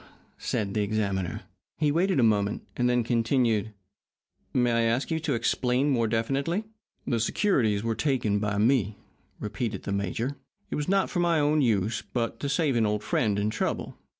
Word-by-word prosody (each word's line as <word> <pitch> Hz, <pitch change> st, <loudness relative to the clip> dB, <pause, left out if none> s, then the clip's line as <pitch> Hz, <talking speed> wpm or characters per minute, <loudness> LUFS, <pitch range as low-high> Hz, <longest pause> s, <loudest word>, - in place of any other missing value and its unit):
said 100 Hz, -2 st, -2 dB
the 105 Hz, -, +1 dB
examiner. 100 Hz, -3 st, -1 dB, 0.4 s
He 150 Hz, -2 st, +2 dB
waited 175 Hz, +1 st, +2 dB
a -, -, +4 dB
moment, 105 Hz, -2 st, +1 dB
and 125 Hz, 0 st, +1 dB
then 125 Hz, -1 st, +2 dB
continued: 115 Hz, -2 st, +1 dB, 0.8 s
"May 125 Hz, -1 st, +2 dB
I 115 Hz, 0 st, +2 dB
ask 115 Hz, +7 st, 0 dB
you 160 Hz, -, +1 dB
to 160 Hz, -, -1 dB
explain 125 Hz, +4 st, +1 dB
more 115 Hz, -4 st, +2 dB
definitely?" 135 Hz, -, 0 dB, 0.4 s
"The 120 Hz, -3 st, 0 dB
securities 110 Hz, -, +1 dB
were 115 Hz, 0 st, 0 dB
taken 115 Hz, -6 st, 0 dB
by 105 Hz, -1 st, -1 dB
me," 110 Hz, -2 st, +2 dB, 0.4 s
repeated 105 Hz, -1 st, -3 dB
the -, -, -4 dB
major. 100 Hz, +8 st, -2 dB, 0.3 s
"It -, -, -1 dB
was 150 Hz, +3 st, -2 dB
not 195 Hz, 0 st, +2 dB
for 180 Hz, -, -1 dB
my 170 Hz, -2 st, +3 dB
own 150 Hz, +1 st, +3 dB
use, 110 Hz, -3 st, +1 dB
but 115 Hz, -2 st, -1 dB
to 140 Hz, -, -2 dB
save 150 Hz, -3 st, +1 dB
an 110 Hz, -2 st, +3 dB
old 105 Hz, 0 st, -1 dB
friend 105 Hz, -4 st, +1 dB
in 105 Hz, +1 st, 0 dB
trouble. 110 Hz, -, -2 dB
115 Hz, 180 wpm, -27 LUFS, 105-140 Hz, 0.8 s, a